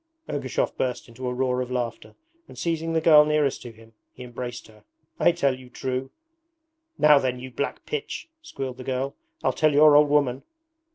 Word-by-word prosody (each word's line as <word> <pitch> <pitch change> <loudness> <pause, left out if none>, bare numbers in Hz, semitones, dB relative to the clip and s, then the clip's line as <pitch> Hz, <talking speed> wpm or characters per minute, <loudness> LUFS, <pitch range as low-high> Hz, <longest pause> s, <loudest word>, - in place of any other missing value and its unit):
Ergushov - - -2
burst 125 -1 -2
into 125 +2 -7
a - - -1
roar 125 0 0
of 125 - -4
laughter, 120 -3 -4 0.3
and - - -14
seizing 165 -1 -2
the 160 - +1
girl 155 -2 +7
nearest 150 -2 0
to 120 - -9
him, 115 0 -18 0.2
he - - -11
embraced 120 0 -7
her. 110 -1 -19 0.4
'I - - +5
tell 140 -6 +1
you 130 -1 -14
true.' 130 +1 -4 0.9
'Now 150 -1 +6
then, 130 -2 -1
you 130 +1 -8
black 140 +4 -4
pitch!' 450 -6 -5
squealed 135 - -6
the 130 - -8
girl, 130 +2 -3 0.3
'I'll - - +2
tell 155 -2 +2
your 150 +1 +7
old 150 0 +6
woman.' 140 -3 +2
130 Hz, 185 wpm, -25 LUFS, 125-150 Hz, 0.9 s, girl